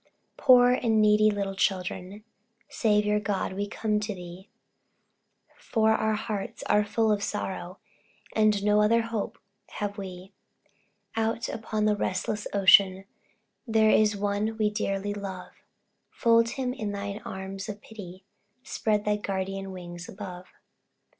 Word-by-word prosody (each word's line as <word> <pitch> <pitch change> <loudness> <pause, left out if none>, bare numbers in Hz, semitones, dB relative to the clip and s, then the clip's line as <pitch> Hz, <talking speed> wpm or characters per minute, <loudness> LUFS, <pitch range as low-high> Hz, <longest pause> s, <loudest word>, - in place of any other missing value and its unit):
Poor 250 -2 +6
and 230 -3 +2
needy 215 0 +5
little 200 -2 -2
children, 190 +1 -2 0.5
Saviour, 210 -1 +2
God, 200 -2 -2
we 200 +2 -3
come 210 +1 -1
to 210 -1 -4
Thee, 180 +2 -10 1.1
For 220 -2 +1
our 220 0 +1
hearts 210 -2 -4
are 210 - +3
full 220 +1 +1
of 205 -1 +1
sorrow, 190 -3 -4 0.6
And 215 -2 +3
no 210 0 +4
other 230 +2 +3
hope 225 0 -4 0.4
have 205 0 -4
we. 190 0 -8 0.8
Out, 225 +1 -1
upon 215 -1 -2
the 210 -1 +3
restless 205 +2 -2
ocean, 195 -1 +5 0.6
There 220 -1 +4
is 210 -1 +3
one 205 +2 -1
we 210 -1 +1
dearly 205 -1 -2
love, 195 -3 -7 0.6
Fold 230 0 +3
him 255 -2 -1
in 215 -5 -4
thine 200 +1 -5
arms 190 +1 -6
of 205 0 -6
pity, 190 -4 -11 0.4
Spread 215 -5 -1
thy 210 0 +2
guardian 195 -1 -3
wings 175 -1 -8
above. 185 -2 -8
210 Hz, 135 wpm, -27 LUFS, 195-215 Hz, 1.1 s, Poor